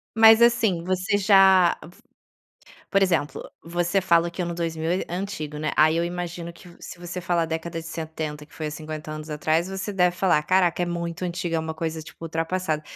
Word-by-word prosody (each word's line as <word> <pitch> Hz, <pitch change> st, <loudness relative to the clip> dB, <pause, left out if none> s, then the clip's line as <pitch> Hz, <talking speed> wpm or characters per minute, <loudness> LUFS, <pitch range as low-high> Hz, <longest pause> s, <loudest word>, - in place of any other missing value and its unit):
Mas 225 Hz, +1 st, +8 dB
assim, 230 Hz, -8 st, +3 dB
você 185 Hz, +2 st, 0 dB
já 190 Hz, -3 st, +5 dB
f 175 Hz, +3 st, -15 dB, 0.9 s
por 195 Hz, 0 st, +3 dB
exemplo, 170 Hz, -6 st, 0 dB, 0.2 s
você 175 Hz, +3 st, 0 dB
fala 170 Hz, -2 st, +3 dB
que 180 Hz, +1 st, -4 dB
ano 170 Hz, 0 st, -3 dB
2000 165 Hz, -1 st, -2 dB
é 185 Hz, -, 0 dB
é 175 Hz, -, -4 dB
antigo, 155 Hz, -6 st, -5 dB
né, 155 Hz, 0 st, -2 dB
aí 155 Hz, +1 st, +5 dB
eu 170 Hz, -, +1 dB
imagino 175 Hz, -1 st, -5 dB
que, 175 Hz, +1 st, -15 dB
se 175 Hz, -, -9 dB
você 175 Hz, +1 st, -6 dB
falar 170 Hz, -1 st, 0 dB
década 165 Hz, +1 st, -4 dB
de 165 Hz, -, -11 dB
70, 155 Hz, -2 st, -5 dB
que -, -, -21 dB
foi 155 Hz, -, -4 dB
há -, -, -3 dB
50 155 Hz, 0 st, -7 dB
anos 155 Hz, 0 st, -7 dB
atrás, 155 Hz, +4 st, 0 dB
você 195 Hz, +2 st, -4 dB
deve 180 Hz, -2 st, +2 dB
falar: 175 Hz, -6 st, +2 dB
"Caraca, 180 Hz, 0 st, +2 dB
é -, -, 0 dB
muito 170 Hz, 0 st, -4 dB
antiga, 175 Hz, -1 st, -2 dB
é -, -, 0 dB
uma 160 Hz, 0 st, -5 dB
coisa, 160 Hz, -1 st, -4 dB
tipo, 165 Hz, -, -12 dB
ultrapassada". 165 Hz, -1 st, -2 dB
170 Hz, 205 wpm, -24 LUFS, 160-185 Hz, 0.9 s, Mas